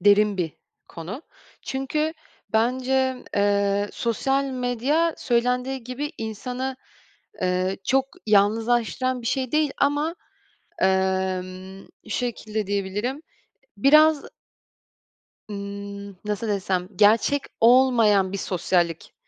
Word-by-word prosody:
derin 205 Hz, +1 st, +4 dB
bir 170 Hz, -4 st, -2 dB, 0.4 s
konu. 180 Hz, -, -7 dB, 0.4 s
Çünkü 300 Hz, +4 st, -1 dB, 0.4 s
bence, 255 Hz, +3 st, +1 dB
eee, 200 Hz, 0 st, +2 dB
sosyal 270 Hz, +4 st, 0 dB
medya 265 Hz, +5 st, 0 dB
söylendiği 250 Hz, +1 st, 0 dB
gibi 285 Hz, +5 st, -4 dB
insanı, 250 Hz, +4 st, -4 dB, 0.7 s
eee, 185 Hz, +1 st, 0 dB
çok 270 Hz, +1 st, +2 dB, 0.2 s
yalnızlaştıran 230 Hz, +4 st, +2 dB
bir 230 Hz, -, -6 dB
şey 260 Hz, -1 st, -1 dB
değil 305 Hz, -2 st, +2 dB
ama, 290 Hz, +3 st, +1 dB, 0.7 s
emm, 190 Hz, 0 st, -1 dB, 0.2 s
şu 215 Hz, -, -13 dB
şekilde 220 Hz, -4 st, -3 dB
diyebilirim, 205 Hz, +8 st, -2 dB, 0.6 s
biraz 305 Hz, +5 st, +5 dB, 1.2 s
Imm, 200 Hz, 0 st, -7 dB
nasıl 210 Hz, +2 st, -2 dB
desem, 190 Hz, -3 st, -1 dB
gerçek 220 Hz, +8 st, +4 dB, 0.2 s
olmayan 230 Hz, -5 st, +5 dB
bir 200 Hz, -, -3 dB
sosyallik, 175 Hz, -3 st, -1 dB
225 Hz, 95 wpm, -24 LUFS, 200-260 Hz, 1.2 s, biraz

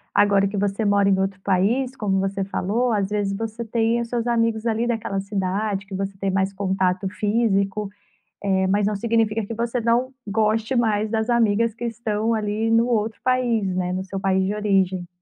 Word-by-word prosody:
agora 200 Hz, -1 st, +4 dB
que 200 Hz, -, -5 dB
você 200 Hz, +2 st, 0 dB
mora 200 Hz, -1 st, +3 dB
em 190 Hz, -1 st, +3 dB
outro 190 Hz, 0 st, -1 dB
país, 210 Hz, +8 st, +1 dB
como 195 Hz, -2 st, 0 dB
você 195 Hz, 0 st, -1 dB
falou, 220 Hz, +6 st, 0 dB
às 200 Hz, -2 st, 0 dB
vezes 205 Hz, -1 st, -1 dB
você 225 Hz, +2 st, -4 dB
tem 225 Hz, +1 st, +1 dB
os 235 Hz, -, -3 dB
seus 235 Hz, -1 st, -2 dB
amigos 230 Hz, -1 st, +1 dB
ali 230 Hz, +1 st, 0 dB
daquela 225 Hz, -4 st, -2 dB
cidade 195 Hz, 0 st, -2 dB
que 195 Hz, -, -11 dB
você 195 Hz, 0 st, -4 dB
tem 195 Hz, 0 st, -1 dB
mais 190 Hz, +1 st, 0 dB
contato 190 Hz, -1 st, 0 dB
físico, 205 Hz, -1 st, 0 dB, 0.6 s
eh, 190 Hz, -1 st, +2 dB
mas 200 Hz, +2 st, +2 dB
não 210 Hz, -, 0 dB
significa 225 Hz, 0 st, +1 dB
que 230 Hz, -, -5 dB
você 235 Hz, +2 st, -1 dB
não 235 Hz, +3 st, +1 dB
goste 220 Hz, +3 st, +1 dB
mais 215 Hz, -2 st, +1 dB
das 220 Hz, +1 st, 0 dB
amigas 230 Hz, -1 st, +2 dB
que 240 Hz, -, -7 dB
estão 225 Hz, -1 st, -1 dB
ali 215 Hz, +1 st, -1 dB
no 230 Hz, +1 st, +4 dB
outro 220 Hz, -2 st, 0 dB
país, 240 Hz, -6 st, +1 dB
né, 180 Hz, -1 st, -1 dB
no 185 Hz, +1 st, -3 dB
seu 195 Hz, 0 st, -5 dB
país 190 Hz, -1 st, +1 dB
de 195 Hz, +2 st, -1 dB
origem. 190 Hz, -4 st, +1 dB
210 Hz, 195 wpm, -23 LUFS, 195-230 Hz, 0.6 s, agora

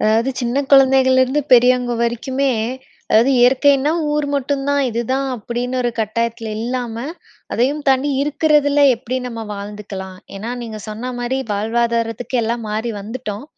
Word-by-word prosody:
அதாவது 225 Hz, +4 st, +2 dB
சின்ன 250 Hz, +3 st, 0 dB
குழந்தைகள்லேருந்து 265 Hz, 0 st, +5 dB
பெரியவங்க 250 Hz, 0 st, +5 dB
வரைக்குமே 260 Hz, +3 st, 0 dB, 0.6 s
அதாவது 230 Hz, +5 st, +5 dB
இயற்கைன்னா 270 Hz, +4 st, +4 dB, 0.2 s
ஊர் 300 Hz, -1 st, 0 dB
மட்டும் 275 Hz, 0 st, -1 dB
தான். 285 Hz, 0 st, +2 dB
இதுதான் 255 Hz, +4 st, -1 dB
அப்பிடின்னு 245 Hz, +3 st, -3 dB
ஒரு 240 Hz, -, 0 dB
கட்டாயத்தில 230 Hz, +1 st, -2 dB
இல்லாம 240 Hz, -1 st, -3 dB, 0.5 s
அதையும் 285 Hz, +5 st, 0 dB
தாண்டி 270 Hz, +2 st, +3 dB
இருக்கிறதில 295 Hz, -1 st, +2 dB, 0.2 s
எப்படி 255 Hz, +2 st, -4 dB
நம்ம 230 Hz, -1 st, -6 dB
வாழ்ந்துக்கலாம். 200 Hz, -2 st, -7 dB, 0.2 s
ஏன்னா, 220 Hz, +4 st, -5 dB
நீங்க 220 Hz, -2 st, -6 dB
சொன்னமாரி 245 Hz, +3 st, -3 dB
வாழ்வாதாரத்துக்கு 230 Hz, +3 st, -1 dB
எல்லாம் 230 Hz, 0 st, -2 dB
மாறி 220 Hz, +2 st, -2 dB
வந்துட்டோம். 215 Hz, +1 st, -6 dB
245 Hz, 125 wpm, -19 LUFS, 225-270 Hz, 0.6 s, குழந்தைகள்லேருந்து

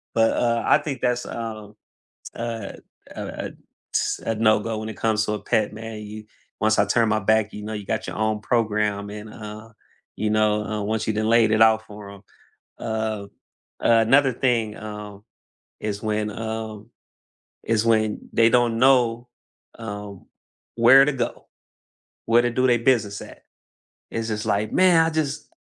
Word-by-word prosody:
But, 115 Hz, 0 st, +4 dB
uh, 115 Hz, -1 st, +1 dB
I -, -, +5 dB
think 140 Hz, -5 st, -5 dB
that's, 125 Hz, 0 st, 0 dB
um, 110 Hz, -2 st, -7 dB, 0.6 s
uh, 115 Hz, -3 st, -4 dB, 0.4 s
uh -, -, -5 dB, 0.2 s
uh -, -, -5 dB, 0.4 s
ts -, -, 0 dB
a 115 Hz, -, 0 dB
no 110 Hz, 0 st, +3 dB
go 110 Hz, -1 st, -3 dB
when 110 Hz, 0 st, -5 dB
it 110 Hz, -, -9 dB
comes 110 Hz, -1 st, +1 dB
to 105 Hz, -, -2 dB
a 105 Hz, -, -3 dB
pet, 105 Hz, 0 st, 0 dB
man, 110 Hz, 0 st, -7 dB
you 105 Hz, 0 st, -9 dB, 0.4 s
once 110 Hz, 0 st, +2 dB
I 100 Hz, -, +5 dB
turn 115 Hz, +3 st, +2 dB
my 110 Hz, 0 st, +1 dB
back, 110 Hz, +1 st, +1 dB
you 105 Hz, -, -7 dB
know, 110 Hz, -, -5 dB
you 105 Hz, -2 st, -6 dB
got -, -, -2 dB
your -, -, -6 dB
own 110 Hz, 0 st, 0 dB
program 105 Hz, -3 st, 0 dB
and, 105 Hz, +1 st, -8 dB
uh, 110 Hz, +1 st, -9 dB, 0.5 s
you 105 Hz, -, -1 dB
know, 105 Hz, 0 st, +2 dB
uh, 105 Hz, 0 st, -3 dB
once 110 Hz, +1 st, -2 dB
you 110 Hz, -, 0 dB
done 110 Hz, +1 st, 0 dB
laid 115 Hz, -2 st, +4 dB
it 110 Hz, 0 st, +4 dB
out 110 Hz, 0 st, +4 dB
for 105 Hz, -2 st, -10 dB
'em. 100 Hz, -, -12 dB, 0.6 s
Uh, 110 Hz, -2 st, -3 dB, 0.6 s
uh, 115 Hz, -1 st, +5 dB
another 135 Hz, +1 st, +4 dB
thing, 115 Hz, -4 st, 0 dB
um, 105 Hz, -1 st, -8 dB, 0.6 s
is 105 Hz, 0 st, -4 dB
when, 105 Hz, 0 st, -1 dB
um 110 Hz, 0 st, -6 dB, 0.8 s
is 115 Hz, -1 st, +1 dB
when 110 Hz, -2 st, +1 dB
they 115 Hz, -, +5 dB
don't 120 Hz, -1 st, +2 dB
know, 120 Hz, -2 st, +3 dB, 0.5 s
um, 105 Hz, -3 st, -8 dB, 0.5 s
where 125 Hz, +4 st, +7 dB
to 150 Hz, -, 0 dB
go, 135 Hz, -, -4 dB, 0.8 s
where 115 Hz, +1 st, +4 dB
to 120 Hz, -, 0 dB
do 130 Hz, +2 st, +2 dB
they 120 Hz, -1 st, +4 dB
business 115 Hz, -4 st, +1 dB
at. -, -, -12 dB, 0.7 s
It's 115 Hz, -1 st, -3 dB
just 105 Hz, 0 st, -3 dB
like, 105 Hz, 0 st, 0 dB
"Man, 180 Hz, -3 st, +5 dB
I -, -, 0 dB
just 155 Hz, -3 st, -2 dB
110 Hz, 175 wpm, -23 LUFS, 105-115 Hz, 0.8 s, where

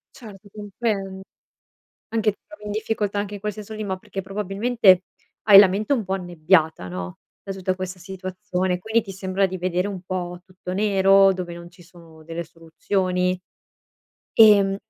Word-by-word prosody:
Certo, 210 Hz, -4 st, -13 dB
compren 205 Hz, -2 st, -4 dB, 0.9 s
anche 220 Hz, -2 st, +1 dB
ti -, -, -26 dB
trovi 210 Hz, 0 st, -14 dB
in -, -, -4 dB
difficoltà 210 Hz, -1 st, -2 dB
anche 205 Hz, 0 st, -3 dB
in 205 Hz, -, -7 dB
quel 210 Hz, +1 st, -2 dB
senso 210 Hz, +1 st, -9 dB
lì, 215 Hz, 0 st, -5 dB
ma 190 Hz, -2 st, -3 dB
perché, 195 Hz, 0 st, -7 dB
probabilmente, 195 Hz, 0 st, +2 dB, 0.4 s
hai 200 Hz, -2 st, +9 dB
la 200 Hz, -1 st, +9 dB
mente 210 Hz, +8 st, 0 dB
un 230 Hz, -5 st, -2 dB
po' 190 Hz, -, -4 dB
annebbiata, 170 Hz, -, +1 dB
no, 90 Hz, 0 st, -6 dB, 0.2 s
da 195 Hz, -, -9 dB
tutta 185 Hz, -1 st, -2 dB
questa 185 Hz, 0 st, -6 dB
situazione, 185 Hz, 0 st, -3 dB
quindi 220 Hz, +5 st, +1 dB
ti 210 Hz, -3 st, -10 dB
sembra 190 Hz, +1 st, 0 dB
di 185 Hz, 0 st, -5 dB
vedere 180 Hz, +1 st, -1 dB
un 190 Hz, -3 st, -6 dB
po' 180 Hz, -1 st, -4 dB
tutto 185 Hz, -1 st, -8 dB
nero 195 Hz, -1 st, +4 dB
dove 180 Hz, -2 st, -6 dB
non 170 Hz, 0 st, -11 dB
ci 175 Hz, 0 st, -18 dB
sono 165 Hz, -2 st, -17 dB
delle 165 Hz, +1 st, -5 dB
soluzioni. 180 Hz, +2 st, -2 dB, 0.9 s
Ehm, 200 Hz, -3 st, +6 dB
190 Hz, 170 wpm, -23 LUFS, 180-205 Hz, 0.9 s, hai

